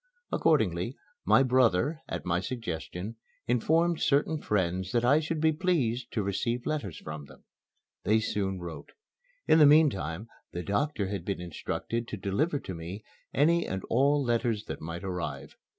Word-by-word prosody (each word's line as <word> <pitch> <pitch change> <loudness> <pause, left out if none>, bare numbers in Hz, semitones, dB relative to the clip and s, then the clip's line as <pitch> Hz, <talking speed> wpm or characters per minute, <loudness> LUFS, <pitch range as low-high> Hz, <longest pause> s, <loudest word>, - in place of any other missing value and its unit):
Accordingly, - - +1 0.3
my 135 - +6
brother, 130 - +3
at - - -4
my 85 0 +1
suggestion, 95 -1 -5 0.3
informed 160 +8 +2
certain 150 +2 +2
friends 95 -2 -1
that 120 0 +2
I 140 +5 +5
should 160 0 -2
be 160 +1 +4
pleased 140 -8 0
to 110 - 0
receive 115 +5 -1
letters 145 - -2
from 75 -1 -7
them. - - -17 0.6
They 110 +3 +3
soon 95 -4 -1
wrote. 85 -2 -8 0.5
In 160 - +6
the 150 - +9
meantime 110 - +3 0.3
the 90 - -3
doctor 115 - 0
had 100 -1 -3
been 100 - -3
instructed 100 +7 -4
to 105 - -5
deliver 120 - 0
to 95 - -6
me 85 +5 -7 0.3
any 170 +4 +3
and 95 0 -3
all 140 +4 +3
letters 115 -3 0
that - - -6
might 85 +3 -6
arrive. 90 -2 -4
115 Hz, 155 wpm, -29 LUFS, 95-145 Hz, 0.6 s, the